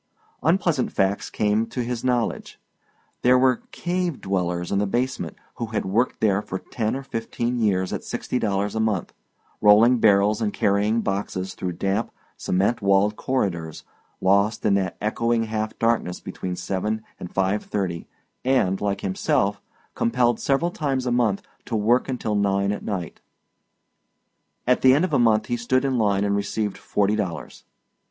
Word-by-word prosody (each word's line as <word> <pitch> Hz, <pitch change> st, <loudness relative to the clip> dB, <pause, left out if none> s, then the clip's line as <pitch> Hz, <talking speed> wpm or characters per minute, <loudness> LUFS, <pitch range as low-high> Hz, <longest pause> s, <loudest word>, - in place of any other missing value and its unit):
Unpleasant 170 Hz, -6 st, +1 dB
facts 95 Hz, +1 st, 0 dB
came 105 Hz, +1 st, +1 dB
to 125 Hz, -, -3 dB
his 120 Hz, -1 st, -4 dB
knowledge. 125 Hz, -2 st, -1 dB, 0.6 s
There 125 Hz, +1 st, +5 dB
were 130 Hz, -1 st, +3 dB
"cave 175 Hz, -3 st, -2 dB
dwellers" 90 Hz, -2 st, -2 dB
in 100 Hz, -, +2 dB
the 105 Hz, -, +1 dB
basement 125 Hz, +6 st, -2 dB, 0.2 s
who 115 Hz, -, -3 dB
had 110 Hz, -1 st, -2 dB
worked 110 Hz, +7 st, 0 dB
there 105 Hz, -2 st, +3 dB
for 95 Hz, -, -5 dB
ten 110 Hz, +3 st, -3 dB
or 135 Hz, -, -5 dB
fifteen 120 Hz, 0 st, -3 dB
years 95 Hz, -4 st, +1 dB
at -, -, -4 dB
sixty 125 Hz, -, -3 dB
dollars 100 Hz, -2 st, 0 dB
a 110 Hz, -, -2 dB
month, 110 Hz, -5 st, -1 dB, 0.5 s
rolling 115 Hz, +4 st, +6 dB
barrels 105 Hz, 0 st, +4 dB
and 105 Hz, -2 st, 0 dB
carrying 105 Hz, +2 st, +1 dB
boxes 95 Hz, -2 st, -3 dB
through 90 Hz, -1 st, -4 dB
damp, 100 Hz, +6 st, -1 dB, 0.3 s
cement 100 Hz, +6 st, 0 dB
walled 100 Hz, +1 st, +3 dB
corridors, 85 Hz, -13 st, -2 dB, 0.4 s
lost 100 Hz, +3 st, +2 dB
in 105 Hz, -, +4 dB
that 95 Hz, -2 st, 0 dB
echoing 115 Hz, +2 st, +1 dB
half 110 Hz, 0 st, -3 dB
darkness 115 Hz, -6 st, 0 dB
between 90 Hz, -1 st, -5 dB
seven 100 Hz, +4 st, -2 dB, 0.2 s
and 90 Hz, -, -7 dB
five 95 Hz, +2 st, 0 dB
thirty 90 Hz, -5 st, -3 dB, 0.4 s
and, 125 Hz, -8 st, +2 dB
like 100 Hz, -1 st, -1 dB
himself, 100 Hz, +1 st, 0 dB, 0.3 s
compelled 120 Hz, 0 st, +1 dB
several 140 Hz, +6 st, +1 dB
times 135 Hz, -6 st, -1 dB
a 125 Hz, -, 0 dB
month 115 Hz, -5 st, +1 dB, 0.2 s
to 115 Hz, -, -3 dB
work 115 Hz, +5 st, +2 dB
until 120 Hz, -4 st, -2 dB
nine 100 Hz, -1 st, +1 dB
at 105 Hz, -, -3 dB
night. 90 Hz, -6 st, -4 dB, 1.4 s
At 125 Hz, 0 st, +3 dB
the 130 Hz, 0 st, +6 dB
end 155 Hz, +6 st, +3 dB
of 175 Hz, -, -5 dB
a 140 Hz, -, +4 dB
month 110 Hz, -2 st, +3 dB
he 120 Hz, -, -1 dB
stood 130 Hz, +3 st, +1 dB
in 130 Hz, -3 st, +1 dB
line 100 Hz, -2 st, +2 dB
and 100 Hz, 0 st, +1 dB
received 100 Hz, 0 st, -2 dB
forty 105 Hz, +1 st, +1 dB
dollars. 95 Hz, -6 st, -5 dB
105 Hz, 160 wpm, -24 LUFS, 100-120 Hz, 1.4 s, rolling